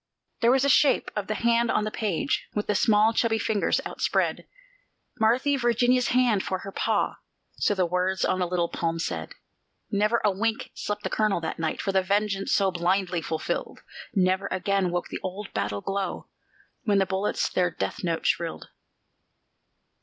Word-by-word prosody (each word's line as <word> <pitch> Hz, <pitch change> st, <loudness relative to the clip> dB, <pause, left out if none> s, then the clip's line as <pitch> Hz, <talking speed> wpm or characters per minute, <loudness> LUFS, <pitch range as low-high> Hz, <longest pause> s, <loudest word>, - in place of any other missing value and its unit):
There 230 Hz, -, +3 dB
was 265 Hz, +1 st, +4 dB
the 280 Hz, -, +3 dB
shape 280 Hz, +1 st, +4 dB
of 205 Hz, -2 st, -3 dB
the 215 Hz, -, -1 dB
hand 235 Hz, 0 st, +2 dB
on 215 Hz, -, +2 dB
the 215 Hz, -, -3 dB
page, 205 Hz, -11 st, -1 dB
with 210 Hz, -, -1 dB
the 210 Hz, -, 0 dB
small, 215 Hz, +2 st, +4 dB
chubby 225 Hz, -1 st, +2 dB
fingers 215 Hz, -1 st, +1 dB
outspread. -, -, -1 dB, 0.7 s
"Marthy 250 Hz, +6 st, +3 dB
Virginia's 245 Hz, 0 st, +2 dB
hand, 245 Hz, -5 st, +3 dB
for 190 Hz, -, -2 dB
her 195 Hz, +1 st, -8 dB
pa," -, -, 0 dB, 0.4 s
so 205 Hz, -, +1 dB
the 185 Hz, -2 st, +2 dB
words 180 Hz, +2 st, 0 dB
on 185 Hz, -, 0 dB
the 180 Hz, -, +1 dB
little 175 Hz, -1 st, 0 dB
palm 165 Hz, 0 st, -2 dB
said. 165 Hz, -, -4 dB, 0.6 s
Never 210 Hz, +3 st, +2 dB
a 205 Hz, -, +4 dB
wink 220 Hz, +3 st, -2 dB
slept 210 Hz, 0 st, -4 dB
the -, -, -3 dB
colonel 215 Hz, -4 st, +1 dB
that 160 Hz, -, -4 dB
night, 160 Hz, -1 st, -2 dB
for 195 Hz, -, 0 dB
the 190 Hz, 0 st, +3 dB
vengeance 200 Hz, +1 st, 0 dB
so 195 Hz, -2 st, +3 dB
blindly 180 Hz, 0 st, 0 dB
fulfilled. 160 Hz, 0 st, -3 dB, 0.3 s
Never 190 Hz, +1 st, +2 dB
again 190 Hz, 0 st, 0 dB
woke 175 Hz, 0 st, -2 dB
the -, -, -5 dB
old 195 Hz, +2 st, -6 dB
battle 100 Hz, 0 st, -2 dB
glow 195 Hz, 0 st, -3 dB, 0.5 s
when 205 Hz, -2 st, +2 dB
the 195 Hz, -, +3 dB
bullets 190 Hz, +2 st, -1 dB
their 180 Hz, -1 st, +1 dB
death 95 Hz, -, -4 dB
note 165 Hz, -2 st, -1 dB
shrilled. 170 Hz, -1 st, -1 dB
200 Hz, 175 wpm, -26 LUFS, 180-220 Hz, 0.7 s, was